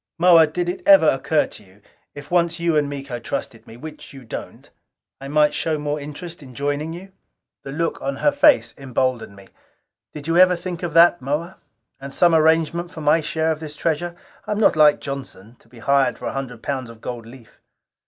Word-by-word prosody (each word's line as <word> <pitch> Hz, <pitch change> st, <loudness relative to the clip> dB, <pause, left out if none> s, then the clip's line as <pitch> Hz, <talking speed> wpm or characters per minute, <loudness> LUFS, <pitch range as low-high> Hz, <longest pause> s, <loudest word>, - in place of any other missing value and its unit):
"Moa, 170 Hz, -2 st, +6 dB
did 175 Hz, +3 st, -3 dB
it 180 Hz, +2 st, -3 dB
ever 195 Hz, -5 st, +7 dB
occur 150 Hz, +2 st, +2 dB
to -, -, -12 dB
you, 95 Hz, +1 st, -22 dB, 0.4 s
if 145 Hz, +2 st, -11 dB
once 170 Hz, -1 st, +1 dB
you 170 Hz, -1 st, +1 dB
and 145 Hz, -1 st, +1 dB
Miko 135 Hz, -3 st, -6 dB
trusted -, -, -6 dB
me 115 Hz, -, -12 dB
which 155 Hz, +2 st, -10 dB
you 135 Hz, -1 st, -11 dB
don't 110 Hz, -, -8 dB, 0.5 s
I 135 Hz, -, -8 dB
might 150 Hz, +1 st, +3 dB
show 160 Hz, -2 st, -1 dB
more 150 Hz, 0 st, -3 dB
interest 150 Hz, +4 st, -8 dB
in 130 Hz, -3 st, -13 dB
joining 145 Hz, +4 st, -2 dB
you?" 185 Hz, +4 st, -10 dB, 0.5 s
The 135 Hz, -, -8 dB
look 165 Hz, +4 st, -2 dB
on 135 Hz, 0 st, -2 dB
her 295 Hz, -, +2 dB
face 290 Hz, +1 st, +4 dB
emboldened 130 Hz, -5 st, -2 dB
me. 100 Hz, -1 st, -16 dB, 0.6 s
"Did 150 Hz, -2 st, -9 dB
you 165 Hz, +1 st, +1 dB
ever 180 Hz, 0 st, +6 dB
think 175 Hz, 0 st, -6 dB
of 175 Hz, -2 st, -4 dB
that, 175 Hz, +1 st, +6 dB
Moa? 150 Hz, +7 st, -3 dB, 0.4 s
And 135 Hz, 0 st, -8 dB
some 170 Hz, +3 st, +3 dB
arrangement 160 Hz, +2 st, +2 dB
for 170 Hz, -3 st, -9 dB
my 150 Hz, +2 st, +3 dB
share 160 Hz, +1 st, -1 dB
of 155 Hz, -, -3 dB
this 155 Hz, -2 st, -8 dB
treasure? 170 Hz, +3 st, -2 dB, 0.3 s
I -, -, -3 dB
am 210 Hz, -, -3 dB
not 210 Hz, -, +4 dB
like 150 Hz, -1 st, +5 dB
Johnson, 130 Hz, -6 st, -8 dB
to -, -, -26 dB
be 120 Hz, -, -17 dB
hired 140 Hz, +4 st, +1 dB
for -, -, -9 dB
a -, -, -3 dB
hundred 125 Hz, -4 st, -6 dB
pounds 130 Hz, -4 st, -3 dB
of 115 Hz, -1 st, -13 dB
gold 115 Hz, -1 st, -7 dB
leaf." 120 Hz, -1 st, -16 dB
150 Hz, 210 wpm, -21 LUFS, 135-170 Hz, 0.6 s, ever